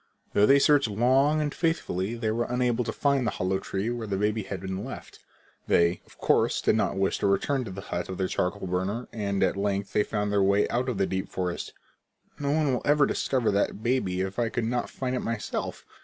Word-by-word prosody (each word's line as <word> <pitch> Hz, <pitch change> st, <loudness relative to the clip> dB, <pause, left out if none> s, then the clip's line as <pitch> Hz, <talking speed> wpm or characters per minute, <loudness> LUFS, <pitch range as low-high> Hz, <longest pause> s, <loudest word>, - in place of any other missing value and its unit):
Though 105 Hz, +1 st, +5 dB
they 140 Hz, -, +7 dB
searched 140 Hz, -2 st, +4 dB
long 130 Hz, +8 st, +3 dB
and 145 Hz, -1 st, -1 dB
faithfully 120 Hz, -, -1 dB
they 115 Hz, -2 st, -1 dB
were 120 Hz, +2 st, 0 dB
unable 125 Hz, -1 st, 0 dB
to -, -, -2 dB
find 140 Hz, -4 st, +1 dB
the 110 Hz, -, -2 dB
hollow 95 Hz, +1 st, 0 dB
tree 95 Hz, +4 st, -3 dB
where 120 Hz, -2 st, -4 dB
the 100 Hz, -1 st, -1 dB
baby 105 Hz, +2 st, 0 dB
had 95 Hz, -1 st, -5 dB
been 95 Hz, +1 st, -4 dB
left. -, -, -9 dB, 0.5 s
They, 85 Hz, +1 st, +3 dB
of -, -, -20 dB
course, -, -, +2 dB
did -, -, +2 dB
not -, -, 0 dB
wish 95 Hz, 0 st, +1 dB
to -, -, +1 dB
return 130 Hz, +8 st, +1 dB
to -, -, -6 dB
the 100 Hz, +1 st, -7 dB
hut 90 Hz, -2 st, -4 dB
of 95 Hz, -, -5 dB
the 95 Hz, -, 0 dB
charcoal 90 Hz, +1 st, -2 dB
burner, 95 Hz, +6 st, -2 dB
and 100 Hz, -3 st, -1 dB
at -, -, +2 dB
length 100 Hz, 0 st, -2 dB
they -, -, +4 dB
found 105 Hz, -1 st, -1 dB
their 100 Hz, -1 st, +3 dB
way 100 Hz, +1 st, +3 dB
out 125 Hz, +2 st, 0 dB
of 120 Hz, -, -2 dB
the 95 Hz, -, +2 dB
deep 95 Hz, +1 st, -3 dB
forest. 90 Hz, -2 st, -3 dB, 0.7 s
"No 140 Hz, -1 st, -1 dB
one 150 Hz, -2 st, +2 dB
will 125 Hz, -, -1 dB
ever 145 Hz, 0 st, +4 dB
discover 130 Hz, -5 st, 0 dB
that 100 Hz, +1 st, 0 dB
baby 115 Hz, -7 st, 0 dB
if 95 Hz, +3 st, -3 dB
I 115 Hz, -1 st, +1 dB
could 115 Hz, +1 st, -2 dB
not 120 Hz, +1 st, -1 dB
find 130 Hz, -1 st, -3 dB
it -, -, 0 dB
myself! 115 Hz, -2 st, -4 dB
105 Hz, 230 wpm, -27 LUFS, 95-125 Hz, 0.7 s, they